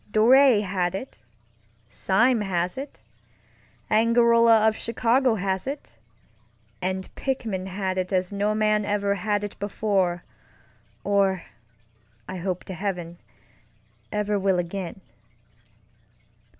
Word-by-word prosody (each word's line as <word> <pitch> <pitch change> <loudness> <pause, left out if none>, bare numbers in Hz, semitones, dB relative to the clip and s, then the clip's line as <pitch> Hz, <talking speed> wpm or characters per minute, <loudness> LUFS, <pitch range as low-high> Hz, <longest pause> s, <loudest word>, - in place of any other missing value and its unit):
Dor├® 240 +1 +5
had 185 -2 -1
it. 225 - -7 0.7
Sime 225 - +2
has 180 -3 -1
it. 275 +2 -8 0.9
Angarola 230 0 +5
of 220 - +2
Chicago 235 +2 +1
has 190 0 -2
it. 280 +1 -7 0.8
And 185 +1 -3
Pickman 220 -8 -3
had 190 0 -2
it 185 +1 -3
as 185 0 0
no 205 +1 0
man 215 -1 +2
ever 205 -1 0
had 205 +1 -1
it 205 - -7
before 195 -4 0 0.8
orŌĆöI 195 -3 +2 1.0
hope 180 -1 -3
to 190 - -7
heavenŌĆöever 195 +3 -6
will 190 -1 +2
again. 180 +1 -4
200 Hz, 100 wpm, -25 LUFS, 185-220 Hz, 1.0 s, Dor├®